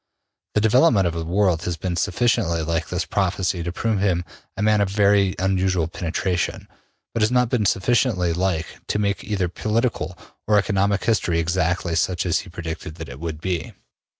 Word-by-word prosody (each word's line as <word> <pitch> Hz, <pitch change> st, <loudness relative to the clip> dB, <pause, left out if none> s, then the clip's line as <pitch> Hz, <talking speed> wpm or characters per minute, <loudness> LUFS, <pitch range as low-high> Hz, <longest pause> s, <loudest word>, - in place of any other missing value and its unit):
The 105 Hz, -, +3 dB
development 110 Hz, -, +4 dB
of 85 Hz, -, 0 dB
the 85 Hz, 0 st, -3 dB
world 90 Hz, -1 st, +1 dB
has 85 Hz, -2 st, -2 dB
been 90 Hz, 0 st, -3 dB
sufficiently 85 Hz, -6 st, +1 dB
like 80 Hz, 0 st, -2 dB
his 90 Hz, -1 st, -1 dB
prophecy 95 Hz, -2 st, 0 dB
to 85 Hz, +1 st, -3 dB
prove 110 Hz, +3 st, -1 dB
him 90 Hz, -3 st, +1 dB, 0.3 s
a 105 Hz, -, -1 dB
man 105 Hz, -1 st, +3 dB
of 100 Hz, -, +1 dB
very 100 Hz, -1 st, +3 dB
unusual 95 Hz, -3 st, +1 dB
penetration, 85 Hz, +2 st, -2 dB, 0.5 s
but 115 Hz, -, -1 dB
has 105 Hz, -, +4 dB
not 125 Hz, -1 st, +3 dB
been 110 Hz, -5 st, +1 dB
sufficiently 95 Hz, -4 st, +2 dB
like 90 Hz, -2 st, 0 dB, 0.2 s
to -, -, 0 dB
make 100 Hz, -1 st, -1 dB
either 100 Hz, -3 st, -1 dB
political 110 Hz, -1 st, -1 dB, 0.3 s
or 105 Hz, 0 st, +4 dB
economic 100 Hz, -1 st, +1 dB
history 100 Hz, -7 st, +1 dB
exactly 85 Hz, +1 st, 0 dB
such 90 Hz, +2 st, 0 dB
as 85 Hz, -, +2 dB
he 100 Hz, -, -9 dB
predicted 80 Hz, -2 st, -6 dB
that -, -, -8 dB
it 60 Hz, +2 st, -9 dB
would 80 Hz, -1 st, -5 dB
be. 85 Hz, -2 st, -3 dB
95 Hz, 180 wpm, -22 LUFS, 85-105 Hz, 0.5 s, development